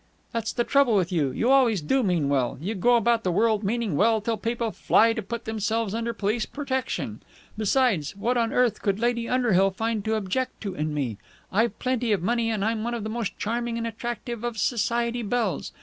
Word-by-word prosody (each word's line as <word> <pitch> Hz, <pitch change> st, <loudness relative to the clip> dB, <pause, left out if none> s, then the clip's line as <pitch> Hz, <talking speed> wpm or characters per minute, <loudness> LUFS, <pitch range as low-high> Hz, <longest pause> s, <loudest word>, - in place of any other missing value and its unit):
"That's 230 Hz, -2 st, -2 dB
the 240 Hz, -, 0 dB
trouble 275 Hz, -3 st, +3 dB
with 185 Hz, -2 st, +1 dB
you. 155 Hz, -6 st, +1 dB
You 230 Hz, -, +1 dB
always 250 Hz, -7 st, +4 dB
do 215 Hz, -, +1 dB
mean 175 Hz, -, +1 dB
well. 135 Hz, -3 st, 0 dB
You 190 Hz, +9 st, -3 dB
go 240 Hz, +5 st, +3 dB
about 235 Hz, -1 st, +2 dB
the 185 Hz, -, +1 dB
world 215 Hz, +3 st, +2 dB
meaning 215 Hz, -3 st, -1 dB
well 220 Hz, +7 st, +3 dB
till 225 Hz, +2 st, -1 dB
people 230 Hz, 0 st, -2 dB
fly 225 Hz, +2 st, +3 dB
to 225 Hz, -, -3 dB
put 235 Hz, +3 st, -6 dB
themselves 220 Hz, -1 st, -1 dB
under 230 Hz, +1 st, -1 dB
police 215 Hz, 0 st, -1 dB
protection. 260 Hz, -, -3 dB, 0.3 s
Besides, 215 Hz, -, +1 dB
what 235 Hz, +5 st, 0 dB
on 230 Hz, -2 st, +1 dB
earth 250 Hz, -3 st, +2 dB
could 200 Hz, -1 st, 0 dB
Lady 235 Hz, 0 st, 0 dB
Underhill 215 Hz, -7 st, +3 dB
find 220 Hz, +2 st, -2 dB
to 220 Hz, 0 st, +1 dB
object 220 Hz, +5 st, -2 dB
to 200 Hz, -3 st, -4 dB
in 155 Hz, -2 st, -2 dB
me? 120 Hz, -8 st, -2 dB, 0.3 s
I've 225 Hz, +4 st, +1 dB
plenty 250 Hz, -3 st, -1 dB
of 190 Hz, -4 st, -1 dB
money, 235 Hz, +2 st, +1 dB
and 210 Hz, -3 st, -1 dB
I'm 220 Hz, -1 st, -1 dB
one 240 Hz, +1 st, -2 dB
of 230 Hz, -, -4 dB
the 215 Hz, -, -4 dB
most 230 Hz, -3 st, -3 dB
charming 235 Hz, +2 st, -2 dB
and 230 Hz, -, -2 dB
attractive 235 Hz, 0 st, -5 dB
of 240 Hz, -2 st, -3 dB
Society 235 Hz, +2 st, 0 dB
belles. 225 Hz, -3 st, -1 dB
225 Hz, 210 wpm, -25 LUFS, 200-235 Hz, 0.3 s, always